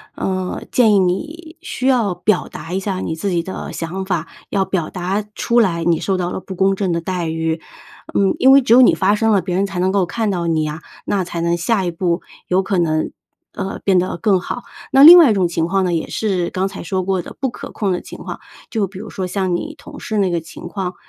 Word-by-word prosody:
呃， 185 -1 -3
建 225 -4 +4
议 200 - +5
你 310 - -2
需 260 -7 -3
要 235 -8 +2
表 205 +1 0
达 165 +3 -8
一 190 - 0
下 190 -1 -3
你 160 - -3
自 200 +5 -2
己 175 -2 +1
的 190 +3 -6
想 175 +3 -4
法， 175 -4 -2 0.2
要 195 -1 +1
表 185 -4 -2
达 190 +3 -2
出 235 +2 +2
来 170 -6 0
你 170 -2 +2
受 190 -1 0
到 175 -1 -1
了 190 - -5
不 190 - -8
公 195 +1 +2
正 190 -2 -1
的 170 - 0
待 175 0 -3
遇。 160 0 -2 0.5
嗯， 195 -1 +2
因 265 - +6
为 275 +1 +8
只 240 -3 +3
有 250 - +8
你 250 - +6
发 200 +2 +2
声 225 +1 +2
了， 200 -3 +3
别 180 - -3
人 195 +2 +2
才 190 -2 -5
能 185 +1 +1
够 195 -2 +2
看 220 +4 -2
到 175 -3 -1
你 160 -2 +1
呀， 155 +1 -4 0.2
那 195 -2 0
才 170 -1 -5
能 170 +1 +1
下 190 +3 0
一 - - 0
步 170 +1 -1 0.3
有 185 +1 +3
可 195 0 -1
能， 155 -2 0 0.4
呃， 190 - -4
变 195 -2 +4
得 180 0 0
更 190 +1 +2
好。 245 - -5 0.3
那 270 +1 +6
另 340 +4 +12
外 320 -9 +7
一 - - +3
种 190 -3 +2
情 165 -1 -1
况 190 +1 +1
呢， 180 - 0
也 165 - -2
是 185 -5 -1
刚 190 +1 -1
才 195 - -8
说 185 +2 -1
过 190 0 -1
的 - - -11
不 270 - 0
可 - - -9
控 200 -3 -1
的 180 - -3
情 - - -11
况， - - -7 0.3
就 215 -4 -1
比 190 0 -10
如 215 +1 -8
说 190 - -4
像 185 -1 -1
你 - - -4
同 - - -12
事 215 - -3
那 195 -2 +2
个 170 -1 -1
情 160 - -10
况， 185 -3 -4
190 Hz, 275 characters per minute, -19 LUFS, 175-205 Hz, 0.5 s, 另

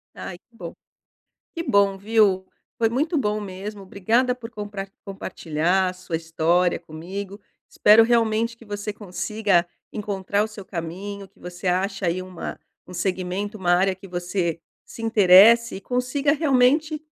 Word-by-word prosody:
Ai 175 - -7
que 235 - -40
bom - - -8 0.8
que 335 - -2
bom, 200 - +2
viu, 200 -3 +2 0.3
foi 225 -1 +3
muito 295 +8 0
bom 215 -7 0
mesmo, 200 +1 -7
obrigada 225 +7 +1
por 240 -2 -9
comprar 205 -3 -6 0.2
compartilhar 180 -1 -1
a - - -6
sua 185 -2 -5
história 165 +2 +1
comigo, 185 +5 -7 0.3
espero 215 +2 +6
realmente 230 0 +1
que 230 - -16
você 205 0 -4
consiga 205 -2 0 0.3
encontrar 205 -1 -1
o 220 - -2
seu 210 -2 -11
caminho, 195 +4 -6
que - - -30
você 180 +1 -6
ache 195 +2 0
aí 175 +2 0
uma 185 -2 -7 0.3
um 180 - -10
segmento, 185 +3 -2
uma 180 -3 +1
área 190 +1 +2
que 195 +1 -13
você 175 -2 -2 0.3
se - - -11
interesse 225 +2 +6
e 190 - -7
consiga 260 +5 0
realmente 300 +1 +2
200 Hz, 150 wpm, -23 LUFS, 185-225 Hz, 0.8 s, espero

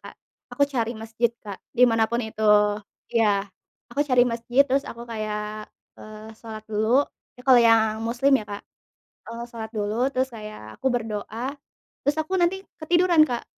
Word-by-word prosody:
Kak, - - -11 0.3
aku 285 - +2
cari 235 -5 -2
masjid 225 +2 -1 0.2
Kak, 200 -2 -7 0.2
di 250 - +7
mana 225 -2 +3
pun 235 0 -1
itu. 220 0 -8 0.7
Iya, 210 -4 +3 0.5
aku 285 - -1
cari 250 -2 +5
masjid 240 +4 +2
terus 275 +1 0
aku 235 +1 -8
kayak, 215 -1 -5 0.3
eee, 215 +1 -10
salat 220 -2 -8
dulu, 220 +6 +2 0.3
itu 250 - -15
kalau 255 -3 +7
yang 220 -1 +3
muslim 240 +5 +1
ya - - -8
Kak. 205 0 -6 0.7
Eee, 230 +1 -6
salat 220 -1 -6
dulu, 215 +5 0
terus 260 -2 -1
kayak 210 - -10
aku 265 - +2
berdoa, 225 +2 -3 0.5
terus 290 +2 0
aku 350 +4 -1
nanti 380 +3 +1 0.2
ketiduran 345 +1 +3
Kak. 240 -1 -3
230 Hz, 165 wpm, -24 LUFS, 215-265 Hz, 0.7 s, di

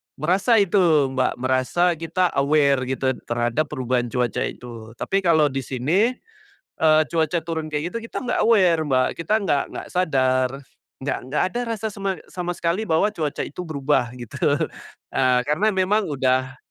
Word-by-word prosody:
merasa 185 - +2
itu, 170 -8 +3
Mbak, 130 -1 0
merasa 130 +8 +1
kita 170 +2 0
aware 140 -2 +3
gitu 130 0 0 0.2
terhadap 120 +6 0
perubahan 130 -3 -1
cuaca 125 0 -1
itu. 115 -2 -10
Tapi 195 +10 -1
kalau 160 -6 +3
di 135 - -2
sini, 170 - +1 0.7
eee, 155 -1 +5
cuaca 160 0 +1
turun 160 -2 -3
kayak 150 +3 -3
gitu, - - -2
kita - - -6
nggak 245 - 0
aware, 185 -8 +4
Mbak. 130 -1 +3
Kita 210 +6 +1
nggak 180 -10 +1
nggak - - -7
sadar. 130 -7 +2 0.5
Nggak 145 - -1
nggak 145 - +1
ada 240 - -1 0.2
rasa 220 +2 -3
sama 195 -2 -3
sama 175 -1 -4
sekali 175 +6 -1
bahwa 165 +6 +2
cuaca 155 -7 -3
itu 150 - -7
berubah, 145 -6 0
gitu. 120 -3 -9 0.8
Eee, 130 -1 +3
karena 165 +9 +2
memang 190 +1 +1
udah 130 -2 0
155 Hz, 160 wpm, -22 LUFS, 130-180 Hz, 0.8 s, eee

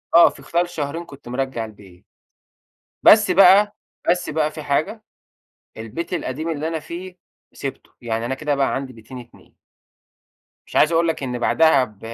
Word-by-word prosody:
آه. 170 - +8
في - - -14
خلال 175 +1 0
شهرين 160 +2 -4
كنت 140 -3 -14
مرجّع 125 -2 -3
البيت. 100 -5 -16 1.0
بس 210 -3 +7
بقى 195 +3 +6 0.3
بس 175 +1 +1
بقى 155 0 0
في 155 -1 -8
حاجة، 155 +10 -1 0.7
البيت 115 +12 -6
القديم 155 -1 -3
اللي 155 0 -3
أنا 165 -1 -2
فيه 180 +4 -9 0.4
سِبته. 135 - -7
يعني 115 -1 -3
أنا 130 - -2
كده 145 +1 -1
بقى 135 -1 0
عندي 135 -1 -4
بيتين 120 +3 -11
اتنين. 120 -1 -16 1.1
مش - - -13
عايز 155 - +4
اقول 170 0 +2
لك 160 -3 -2
إن 125 -2 -3
بعدها 160 +1 +4
ب 105 -4 -10
150 Hz, 165 wpm, -21 LUFS, 125-170 Hz, 1.1 s, آه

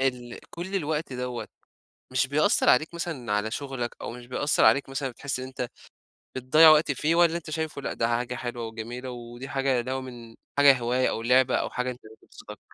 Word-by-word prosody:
ال 125 -3 -2
كلّ 180 +4 -7
الوقت 155 -4 -2
دوّة، 125 -1 -4 0.6
مش 130 +1 +2
بيأثّر 145 +3 +2
عليك 155 +6 +3
مثلًا 155 -10 -4
على 105 +1 0
شغلك، 135 -2 -4
أو - - -4
مش 120 0 -10
بيأثّر 145 +4 +1
عليك 140 0 +4
مثلًا 135 0 -3
بتحس 135 +3 -4
إن 130 - -5
أنتَ 125 -2 -5 0.7
بتضيّع 155 +6 +6
وقت 155 -1 +5
فيه، 155 +5 0
والّا 170 -1 +4
أنتَ 155 - -9
شايفه 155 -2 -3
لأ - - -3
ده 115 - 0
حاجة 120 +1 -1
حلوة 120 -1 -5
وجميلة 120 +3 -7
ودي 120 +2 -9
حاجة 135 -2 +1
اللي 130 +2 -4
هو 130 - -2
من 120 -3 -10 0.2
حاجة 140 -2 +6
هواية 125 +2 +1
أو 110 - -3
لعبة 125 +2 +3
أو - - -1
حاجة 125 0 -2
أنتَ 125 - -11 0.2
بتبسطك؟ - - -12
130 Hz, 200 wpm, -26 LUFS, 120-145 Hz, 0.7 s, بتضيّع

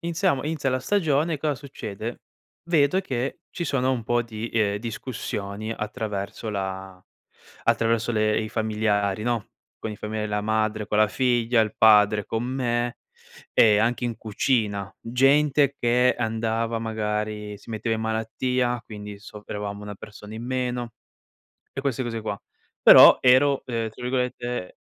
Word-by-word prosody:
Iniziamo 170 -4 0
inizia 150 -3 -1
la 130 0 0
stagione 160 -1 +1
e - - -5
cosa 150 -1 0
succede? 120 -5 -7 0.4
Vedo 165 +1 +3
che 130 -7 -3
ci 170 - -4
sono 130 -3 +1
un 120 -3 -2
po' 120 0 +1
di, 115 0 -6
ehm, 105 -3 +1
discussioni 110 -2 -5
attraverso 105 0 -4
la 95 -2 -5 0.6
attraverso 115 +1 +1
le 110 0 +2
i 110 - -4
familiari, 105 -2 0
no, 120 -3 -1 0.3
con 110 - -5
i 105 - -7
familia 105 0 -4
la 105 0 -1
madre, 110 -1 0
con 105 - 0
la 110 -1 +5
figlia, 120 -2 +2
il 110 - -3
padre, 105 -1 +5
con 115 +1 -2
me 120 -2 -1 0.5
e 105 -2 +5
anche 120 +3 +1
in 120 -2 -2
cucina. 105 -3 -1
Gente 140 +3 +3
che 125 +1 +3
andava 115 0 -1
magari 105 -1 -3
si - - -14
metteva 110 +1 -1
in 110 - -5
malattia, 120 +2 -1
quindi 105 -2 -9
soffrivamo 105 0 -7
1 105 0 -7
persona 105 +1 -11
in 115 +2 -6
meno 125 -2 -2 0.8
e 135 - -4
queste 135 -2 -1
cose 115 -2 -4
qua. 105 -2 -4 0.4
Però - - +10
ero, 130 +2 +4
uhm, 115 -2 -2
tra 115 - -13
virgolette... 125 -4 -2
115 Hz, 150 wpm, -25 LUFS, 105-125 Hz, 0.8 s, Però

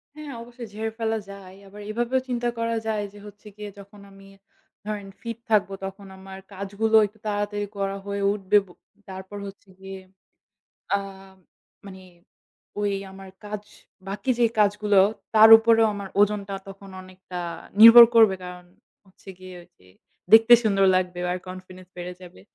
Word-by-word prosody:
হ্যাঁ, 300 -3 -9
অবশ্যই 240 0 -11
ঝেড়ে 220 +1 -4
ফেলা 225 0 -1
যায়। 195 -2 -12
আবার 205 +2 -13
এভাবেও 240 +4 -1
চিন্তা 240 -1 -1
করা 230 0 -1
যায় 215 -1 -2
যে - - -14
হচ্ছে 210 +1 -14
গিয়ে 210 0 -8
যখন 200 +1 -15
আমি 195 0 -17 0.6
ধরেন 205 -2 -5
fit 230 -1 -6
থাকবো, 200 -2 +2
তখন 195 +1 -9
আমার 190 0 -11
কাজগুলো 200 +3 -2
একটু 220 +2 -24
তাড়াতাড়ি 205 0 -3
করা 195 0 -3
হয়ে 200 0 -4
উঠবে। 205 0 +1
ব - - -22 0.4
তারপর 190 +2 -9
হচ্ছে 195 0 -14
গিয়ে 190 0 -9 1.0
আ - - +2 0.9
মানে 190 -1 -12 0.8
ওই 205 -1 -1 0.2
আমার 195 0 -12 0.2
কাজ, 210 0 -6 0.5
বাকি 200 +5 -5
যে 235 - +4
কাজগুলো 205 -1 +2 0.4
তার 220 +1 +8
উপরেও 225 0 +3
আমার 200 -1 -7
ওজনটা 205 -1 0
তখন 195 0 -12
অনেকটা 185 -1 -10 0.4
নির্ভর 230 +2 +11
করবে। 220 -4 +5
কারণ, 180 0 -10 0.4
হচ্ছে 190 +1 -18
গিয়ে 185 0 -11
ওই 170 - -20
যে 90 - -23 0.5
দেখতে 225 +2 +8
সুন্দর 195 -3 +2
লাগবে 180 -1 -2
আর 180 - -2
confidence 185 0 -12
বেড়ে 180 +1 -7
যাবে। 175 - -14
200 Hz, 155 wpm, -23 LUFS, 190-220 Hz, 1.0 s, নির্ভর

